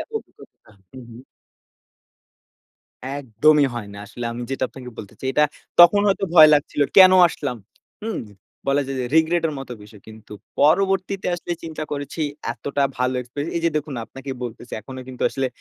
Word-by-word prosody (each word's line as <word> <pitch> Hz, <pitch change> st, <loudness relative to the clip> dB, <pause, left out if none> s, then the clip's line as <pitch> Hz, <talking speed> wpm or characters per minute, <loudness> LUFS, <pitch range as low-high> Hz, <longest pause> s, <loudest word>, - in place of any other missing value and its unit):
অভিজ্ঞতা 440 Hz, -, -10 dB, 0.2 s
হু, 130 Hz, -, -11 dB
হু। 115 Hz, -, -12 dB, 2.0 s
একদমই 145 Hz, +4 st, +3 dB
হয় 110 Hz, -4 st, -6 dB
না। 100 Hz, -, -9 dB
আসলে 120 Hz, +3 st, -8 dB
আমি 120 Hz, +1 st, -6 dB
যেটা 135 Hz, -1 st, -1 dB
আপনাকে 125 Hz, -2 st, -10 dB
বলতে 105 Hz, 0 st, -9 dB
চাই, 130 Hz, -, -3 dB
এটা 150 Hz, +2 st, +4 dB, 0.4 s
তখন 175 Hz, +4 st, +8 dB
হয়তো 195 Hz, 0 st, +1 dB
ভয় 155 Hz, -2 st, +10 dB
লাগছিল। 145 Hz, 0 st, -1 dB, 0.2 s
কেনো 185 Hz, -1 st, +9 dB
আসলাম? 140 Hz, -6 st, -4 dB, 0.5 s
হুম? 225 Hz, -1 st, -3 dB, 0.5 s
বলা 140 Hz, +1 st, +2 dB
যায় 135 Hz, -, -4 dB
যে -, -, -2 dB
রিগ্রেট 165 Hz, +1 st, +2 dB
এর -, -, -4 dB
মতো 135 Hz, -2 st, -7 dB
বিষয়। 105 Hz, -1 st, -15 dB
কিন্তু 110 Hz, -1 st, -13 dB, 0.3 s
পরবর্তীতে 190 Hz, +5 st, +2 dB
আসলে 175 Hz, 0 st, -5 dB
চিন্তা 160 Hz, -1 st, -5 dB
করেছি, 145 Hz, +2 st, -4 dB, 0.3 s
এতটা 140 Hz, +4 st, -3 dB, 0.2 s
ভালো 125 Hz, 0 st, 0 dB
এক্সপেরিয়েন্স 145 Hz, +5 st, -6 dB
এই 170 Hz, -, 0 dB
যে 170 Hz, -, +3 dB
দেখুন 150 Hz, -1 st, -3 dB
আপনাকে 135 Hz, +3 st, -9 dB
বলতেছি, 120 Hz, 0 st, -9 dB
এখনো 130 Hz, +4 st, -9 dB
কিন্তু 130 Hz, -1 st, -7 dB
আসলে 135 Hz, -1 st, -1 dB
140 Hz, 165 wpm, -22 LUFS, 125-160 Hz, 2.0 s, ভয়